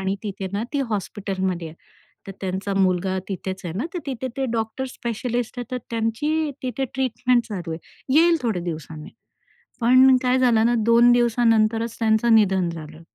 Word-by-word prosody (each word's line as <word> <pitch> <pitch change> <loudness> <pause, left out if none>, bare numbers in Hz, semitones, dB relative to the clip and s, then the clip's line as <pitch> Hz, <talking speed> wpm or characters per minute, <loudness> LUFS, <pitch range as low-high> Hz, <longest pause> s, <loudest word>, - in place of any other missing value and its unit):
आणि 190 +1 -1
तिथे 195 -2 -4
ना 205 +3 -1
ती 285 - 0
हॉस्पिटलमध्ये 190 -4 -3
आहे. 160 - -13 0.5
तर 195 - -6
त्यांचा 190 +1 -3
मुलगा 190 0 +1
तिथेच 190 0 -5
आहे 170 - -4
ना, 245 - -1
तर - - -1
तिथे 260 -1 -3
ते 270 - -1
डॉक्टर 225 +3 -2
स्पेशलिस्ट 240 0 -3
आहेत, 245 - -4
तर 250 - -1
त्यांची 290 +8 -1
तिथे 255 +1 -2
ट्रीटमेंट 250 -1 +1
चालू 180 -6 -5
आहे. 160 - -6 0.4
येईल 335 +1 +5
थोडे 220 -7 -1
दिवसांनी. 155 -2 -6 0.7
पण 255 +2 +6
काय 255 +1 +2
झालं 235 -3 +4
ना 240 - +2
2 235 +1 +6
दिवसानंतरच 230 -1 +2
त्यांचं 225 0 +3
निधन 190 -5 +3
झालं. 160 -1 -9
225 Hz, 165 wpm, -23 LUFS, 190-245 Hz, 0.7 s, पण